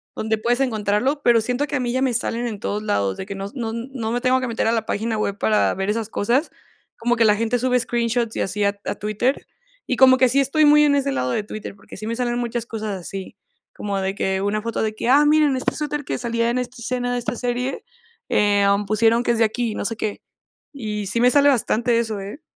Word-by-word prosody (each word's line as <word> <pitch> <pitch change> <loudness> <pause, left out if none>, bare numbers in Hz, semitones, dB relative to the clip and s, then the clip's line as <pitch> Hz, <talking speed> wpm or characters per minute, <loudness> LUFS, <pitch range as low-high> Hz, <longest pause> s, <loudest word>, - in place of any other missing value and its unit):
donde 220 0 -1
puedes 240 +3 0
encontrarlo, 245 +3 0
pero 235 -1 +5
siento 250 +5 -1
que 295 - -3
a - - -2
mí 245 -1 -1
ya 260 - 0
me 265 -2 +1
salen 235 0 -1
en 215 -3 -5
todos 210 +1 -3
lados, 100 - 0
de - - -5
que 200 0 -6
no 195 0 -5
no 230 -4 -4
no 235 -1 -4
me 245 +1 -1
tengo 255 +1 +3
que 255 - -2
meter 230 -1 -1
a - - +3
la 225 -1 0
página 220 +1 -2
web 200 -1 -2
para 215 0 +2
ver 190 +2 -2
esas 220 0 -1
cosas, 245 +9 0 0.5
como 240 +1 +1
que 230 -1 +3
la 210 -1 +5
gente 230 +3 0
sube 250 +1 +2
screenshots 235 -1 -1
y - - -1
así 205 +2 -1
a 200 0 +2
T 200 - -8
a - - -2
Twitter, 215 +6 -1 0.4
y 255 - 0
como 260 0 +7
que 255 - +5
sí 270 +3 +2
estoy 280 +3 +3
muy 300 0 +6
en 290 -1 +4
ese 280 0 0
lado 125 - -1
de 210 - -1
Twitter, 210 -1 -7
porque 200 - -13
sí 215 - -7
me 230 - -2
salen 240 0 -1
muchas 240 -1 -3
cosas 215 -4 -4
así. 190 +2 -7 0.4
Como 200 -1 -3
de 190 0 -1
que 190 -1 -1
una 205 +2 -1
foto 230 0 -2
de 220 -1 -1
que: 225 - -4
"¡Ah, 285 +3 +6
miren, 300 -2 +4
este 255 - -1
suéter 295 -1 -3
que - - -3
salía 235 -1 -1
en 240 - 0
esta 250 0 -4
escena 245 0 -2
de 245 - 0
esta 240 -1 -3
serie, 245 +2 -3 0.5
em, 200 0 +3
pusieron 225 +3 +2
que 240 - +1
es 235 - 0
de 225 - +4
aquí 230 +1 -2
y - - -6
no - - -4
sé 225 - -1
qué". 215 -1 -4 0.5
Y 210 -6 -4
sí 230 +5 0
me 250 - +6
sale 285 +1 +5
bastante 240 -2 +2
eso, 220 -3 -2
¿eh? 200 +9 -8
230 Hz, 260 wpm, -22 LUFS, 210-250 Hz, 0.5 s, como